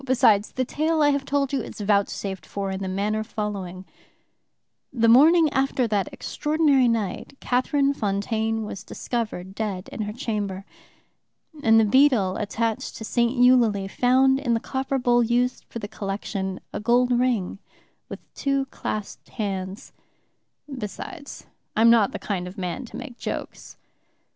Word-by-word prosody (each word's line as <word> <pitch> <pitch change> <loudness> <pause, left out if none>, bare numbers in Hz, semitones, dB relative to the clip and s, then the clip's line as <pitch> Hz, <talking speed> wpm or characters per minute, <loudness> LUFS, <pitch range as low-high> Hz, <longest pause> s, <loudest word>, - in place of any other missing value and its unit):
Besides, 250 -6 +3
the 255 - -1
tale 310 +4 +1
I 290 - +5
have 280 -1 -1
told 280 -1 0
you 270 - +1
is - - -9
vouchsafed 200 -1 -1
for 195 -1 -3
in 190 0 -4
the 190 - -3
manner 205 +3 -1
following: 200 -4 -5 1.1
"The 230 -2 +2
morning 310 +8 +7
after 265 -2 +1
that 205 -3 -1
extraordinary 295 -4 +1
night 230 +3 -2
Catherine 275 +3 +1
Fontaine 220 0 -1
was 195 -2 -7
discovered 215 -6 -4
dead 200 -3 -4
in - - -6
her 210 0 -3
chamber. 205 -5 -3 1.0
And 225 -3 +5
the 220 - +4
beadle 220 -5 +4
attached 220 +1 -2
to 220 - -7
St. 240 +3 +1
Eulalie 240 -6 +4
found 260 +5 +3
in 240 -4 0
the - - 0
copper 265 +2 -2
bowl 245 -1 +3
used 240 +2 0
for - - -8
the 205 - -5
collection 195 -2 -4
a - - -3
gold 240 +3 +2
ring 235 -7 0 0.5
with - - -7
two 275 -1 0
clasped 210 -2 -5
hands. 195 -3 -5 0.9
Besides, 280 - -7 0.3
I'm 230 +1 +6
not 225 -4 +4
the - - -4
kind 180 -4 -3
of 185 +4 -10
man 185 +8 -4
to - - -9
make 250 -4 -9
jokes. - - -6
225 Hz, 150 wpm, -24 LUFS, 200-260 Hz, 1.1 s, morning